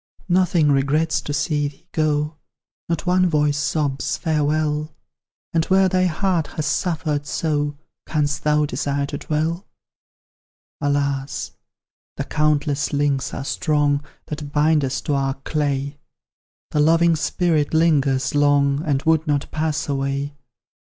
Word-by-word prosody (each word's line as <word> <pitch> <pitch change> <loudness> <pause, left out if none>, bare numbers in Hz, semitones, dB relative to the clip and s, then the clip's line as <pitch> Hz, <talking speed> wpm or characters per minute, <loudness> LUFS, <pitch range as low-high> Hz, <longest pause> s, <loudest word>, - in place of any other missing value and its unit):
"Nothing 175 -4 +3
regrets 145 +2 +1
to 145 - -5
see 145 0 0
thee 145 +5 -13
go 150 0 0 0.5
Not 170 +1 -1
one 180 0 +3
voice 150 -2 +1
sobs' 145 -3 -1
farewell;' 150 -1 0 0.6
And 165 -1 +2
where 190 0 +4
thy 185 0 +2
heart 175 -2 0
has 155 - -1
suffered 155 -4 -1
so, 145 -2 -1 0.3
Canst 145 -2 0
thou 150 0 +3
desire 140 +1 -1
to 140 - -5
dwell?" 160 +4 -2 1.1
"Alas! 140 -1 -1 0.7
the - - -1
countless 150 -1 0
links 140 -2 0
are 135 - -5
strong 145 -2 +1 0.2
That 150 -1 -6
bind 150 0 +3
us 135 0 -2
to 145 - -2
our 135 -1 0
clay; 140 0 -2 0.7
The 150 - 0
loving 165 +2 +4
spirit 160 -1 0
lingers 145 -5 +2
long, 145 0 +3
And 140 -3 0
would 160 -1 +2
not 145 -1 0
pass 155 0 -1
away! 140 0 -2
150 Hz, 130 wpm, -22 LUFS, 145-160 Hz, 1.1 s, where